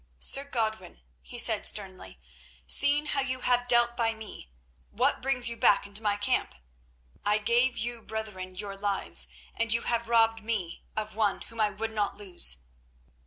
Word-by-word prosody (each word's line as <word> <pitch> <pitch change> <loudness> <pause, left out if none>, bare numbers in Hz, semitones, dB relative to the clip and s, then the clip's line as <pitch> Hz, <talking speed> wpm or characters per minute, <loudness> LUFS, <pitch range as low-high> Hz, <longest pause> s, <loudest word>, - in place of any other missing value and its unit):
"Sir 275 - +3
Godwin," 220 - -4 0.2
he 60 - -10
said - - +2
sternly, 190 -3 -2 0.5
"seeing 290 +1 +4
how 285 -2 0
you 255 -1 -3
have 245 0 +2
dealt 240 -1 +4
by 225 -1 0
me, 215 - -11 0.4
what - - 0
brings 255 -2 +3
you 235 - 0
back 205 -3 +3
into 200 +2 -5
my 205 -2 0
camp? 205 - 0 0.7
I 210 +1 +2
gave 240 +4 +2
you 235 +1 -4
brethren 210 -5 -7
your 200 +1 -6
lives, 200 0 -1 0.3
and 230 -1 +1
you 230 +1 +3
have 235 -1 -1
robbed 225 -1 +3
me 215 -6 -4 0.2
of 215 0 -3
one 210 -2 0
whom 230 -1 -6
I 210 - +3
would 225 +2 -5
not 210 -2 -2
lose." 175 - +2
220 Hz, 165 wpm, -28 LUFS, 205-240 Hz, 0.7 s, seeing